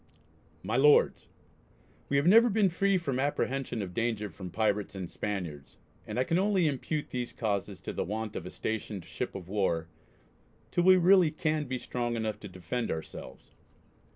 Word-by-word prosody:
MY 110 - -1
LORDS, 145 +2 +4 0.8
We 140 - +2
have 140 - +2
never 230 +6 +7
been 205 -2 +3
free 195 +2 +2
from 140 -7 -2
apprehension 135 -4 -1
of 90 -2 -7
danger 110 -3 -1
from 90 +3 -8
Pirates 105 0 0
and 95 -2 -4
Spaniards, 85 -9 -5 0.3
and 105 - -4
I 125 - +3
can 165 +6 +1
only 195 -3 +2
impute 150 +1 -2
these 125 -1 -3
causes 105 -5 -2
to - - -5
the - - -1
want 110 +2 -4
of 85 - -5
a - - -5
stationed 105 -4 -4
ship - - -5
of 90 -3 -7
war, 90 -5 0 0.8
till 175 - +1
we 185 0 +8
really 180 -1 +6
can 155 -1 -1
be 130 -1 -3
strong 120 -1 -3
enough 110 -2 -2
to 105 - -8
defend 95 +6 -4
ourselves.... 80 -1 -7
120 Hz, 175 wpm, -30 LUFS, 100-155 Hz, 0.8 s, we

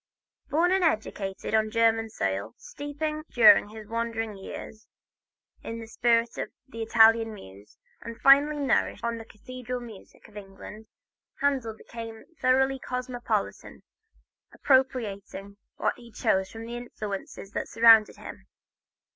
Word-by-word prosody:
Born 335 +4 +2
and 380 -1 +2
educated 210 - -2
on 220 0 +2
German 225 0 +2
soil, 100 - -3
steeped 290 +1 -8 0.3
during 220 -3 +7
his 215 -1 -11
wanderer's 225 -1 -3
years 215 +3 -9 0.7
in 230 0 -6
the 225 - -8
spirit 230 +1 +1
of - - -3 0.2
the 230 -3 -8
Italian 225 0 +4
muse, 100 - -14 0.2
and 230 0 -9
finally 285 +2 +6
nourished 280 -2 0
on 235 0 -2
the 225 - -9
cathedral 250 +3 -7
music 230 -5 -13
of 215 - -21
England, 205 +2 -11 0.5
Handel 260 -6 0
became 225 -1 -9 0.2
thoroughly 265 +1 +3
cosmopolitan, 250 -1 -4 0.7
appropriating 210 -7 0 0.2
what - - 0
he 235 -1 -14
chose 190 -2 0
from 225 0 -9
the 235 +1 -6
influences 205 -4 -7
that - - -4
surrounded 225 -1 +6
him. - - -11
225 Hz, 130 wpm, -27 LUFS, 215-250 Hz, 0.7 s, during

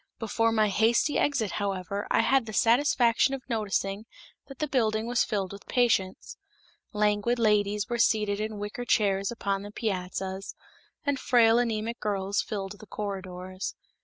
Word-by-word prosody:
Before 225 0 0
my 215 -2 +2
hasty 230 +8 +2
exit, 250 -9 +1
however, 200 0 -3
I - - +3
had 265 -4 +2
the 215 - -6
satisfaction 240 +2 +3
of 265 - -11
noticing 210 -2 -2 0.4
that 275 -2 -11
the 305 - -2
building 220 -5 +1
was 240 0 +2
filled 195 -3 -2
with 200 - -12
patients. 225 -7 0 0.5
Languid 210 +2 +1
ladies 210 -2 +2
were 240 -1 -2
seated 210 -3 +2
in 215 0 -3
wicker 205 +4 -5
chairs 200 -4 +1
upon 200 -4 -2
the 205 - -8
piazzas, 190 -2 -4 0.5
and 285 -2 0
frail 235 -2 +4
anemic 230 -1 -2
girls 200 -1 -1
filled 200 -1 -5
the 215 - -13
corridors. 185 -2 -5
215 Hz, 150 wpm, -27 LUFS, 200-235 Hz, 0.5 s, frail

